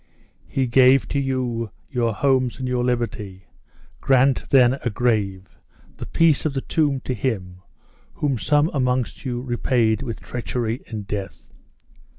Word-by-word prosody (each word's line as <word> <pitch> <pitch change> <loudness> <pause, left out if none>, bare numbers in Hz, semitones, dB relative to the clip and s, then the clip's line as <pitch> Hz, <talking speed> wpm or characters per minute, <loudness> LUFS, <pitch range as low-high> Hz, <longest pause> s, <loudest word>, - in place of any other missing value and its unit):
"He 135 - 0
gave 130 +2 +5
to 140 - 0
you 125 -4 -2 0.2
your 120 -4 0
homes 130 +1 +1
and 130 -1 -4
your 125 -1 0
liberty! 115 -6 -3 0.5
grant, 135 0 +2
then, 130 0 +5
a 120 - 0
grave, 100 -6 -1 0.4
the - - -7
peace 165 -4 +3
of 150 -3 -2
the 135 - -1
tomb 145 -4 0
to 130 - -3
him, 95 -7 -3 0.5
whom 140 -5 -1
some 145 - +2
amongst 125 -3 -1
you 120 -2 -2
repaid 120 -3 +1
with 120 -5 -5
treachery 120 -1 -3
and 105 -3 -6
death!" 100 -1 -6
125 Hz, 145 wpm, -22 LUFS, 115-135 Hz, 0.5 s, gave